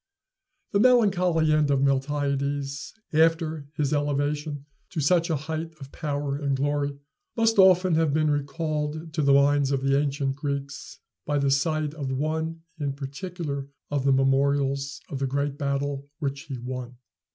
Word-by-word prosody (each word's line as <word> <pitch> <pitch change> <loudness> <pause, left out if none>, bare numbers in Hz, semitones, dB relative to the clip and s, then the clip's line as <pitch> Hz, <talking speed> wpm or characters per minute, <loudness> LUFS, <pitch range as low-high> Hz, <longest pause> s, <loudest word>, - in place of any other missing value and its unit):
The 200 - +2
melancholy 185 -10 +4
end 155 -1 +3
of 140 -1 +2
Miltiades, 140 0 -1 0.2
after 160 -1 +2
his 145 -1 0
elevation 145 0 -1 0.2
to 170 - -4
such 170 +4 +3
a 160 - +2
height 160 +2 -4
of 135 -1 -10
power 145 -2 -2
and 140 -2 0
glory, 145 0 -1 0.4
must 225 -2 +3
often 185 -1 +6
have 160 -2 +3
been 155 +1 +2
recalled 155 +2 -2
to 155 - 0
the 140 -1 +4
minds 140 0 +4
of 135 -1 0
the 135 +1 +3
ancient 140 -1 -1
Greeks 140 -1 -4 0.3
by 145 - +1
the 140 -1 +2
sight 150 +1 +1
of 140 -4 -4
one 160 +4 -2 0.2
in 140 -2 -1
particular 140 0 -5 0.2
of 145 -2 0
the 135 - +3
memorials 135 +1 +1
of 140 - -3
the 135 - 0
great 140 +2 -2
battle 140 0 -2
which 140 -2 -3
he 135 -2 -5
won. 125 0 -6
145 Hz, 155 wpm, -26 LUFS, 140-155 Hz, 0.4 s, often